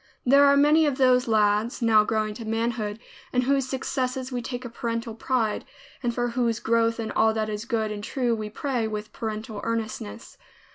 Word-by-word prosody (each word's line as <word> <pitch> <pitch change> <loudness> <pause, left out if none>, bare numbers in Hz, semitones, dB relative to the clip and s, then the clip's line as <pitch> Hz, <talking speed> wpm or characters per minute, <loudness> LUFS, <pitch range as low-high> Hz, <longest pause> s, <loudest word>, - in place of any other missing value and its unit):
There 280 +3 +6
are 280 0 +5
many 300 +2 +5
of 275 -3 -1
those 255 -2 +4
lads, 215 +1 +2
now 225 -3 +5
growing 215 0 -1
to 230 - -8
manhood, 225 -1 -2 0.3
in 250 - +2
whose 270 0 +1
successes 260 0 -2
we 245 -1 -2
take 245 +1 -5
a - - -5
parental 230 0 -3
pride, 225 -2 -1 0.4
and 240 - 0
for 240 0 -1
whose 235 -2 0
growth 230 0 +1
in 220 -1 -3
all 220 +1 +3
that 215 -1 -1
is 210 +1 -4
good 225 -3 -1
and 205 -1 -5
true 245 +1 0
we 215 -1 -3
pray, 240 0 -2
with 215 0 -5
parental 215 -1 -5
earnestness. 220 - -4
230 Hz, 190 wpm, -25 LUFS, 215-250 Hz, 0.4 s, There